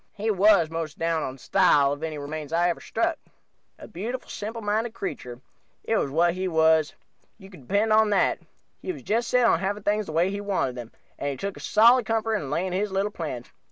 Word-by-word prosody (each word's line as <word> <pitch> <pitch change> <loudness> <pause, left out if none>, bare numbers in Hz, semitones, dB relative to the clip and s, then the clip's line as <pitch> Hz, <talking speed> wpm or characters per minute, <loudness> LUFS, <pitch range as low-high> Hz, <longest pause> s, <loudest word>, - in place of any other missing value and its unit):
He 215 +2 -1
was 200 -4 +4
the - - -12
most 165 -1 -4
down 165 -1 0
on 130 -2 -5
style 145 -2 +3
of 145 - -8
any 160 -1 -4
remains 150 +1 -6
I 170 +1 +2
ever 170 - -3
struck. - - -1 0.6
A - - -11
beautiful, 235 +8 -6
simpleminded 220 +1 -3
creature 125 - -6 0.4
it 225 - 0
was 140 - 0
what 170 +4 +2
he 185 +1 -3
was, 160 -2 +3 0.4
you 195 -2 -14
can 140 -10 -15
depend 215 +2 +2
on 220 0 +4
that. 205 - +2 0.4
He - - -3
was - - -10
just 230 +3 0
set 250 -1 +3
on 170 - +4
having 200 +2 -3
things 210 0 0
the - - -5
way 170 +4 +1
he 200 0 -4
wanted 195 -10 -1
them, 120 -2 -8 0.3
and 145 - -2
he 140 - -4
took 200 +4 -4
a - - -11
solid 235 +2 +4
comfort 225 -1 0
in 145 -9 -6
laying 180 +5 -1
his 200 +2 -1
little 195 +2 -1
plans. 150 -10 -6
190 Hz, 220 wpm, -25 LUFS, 155-210 Hz, 0.6 s, was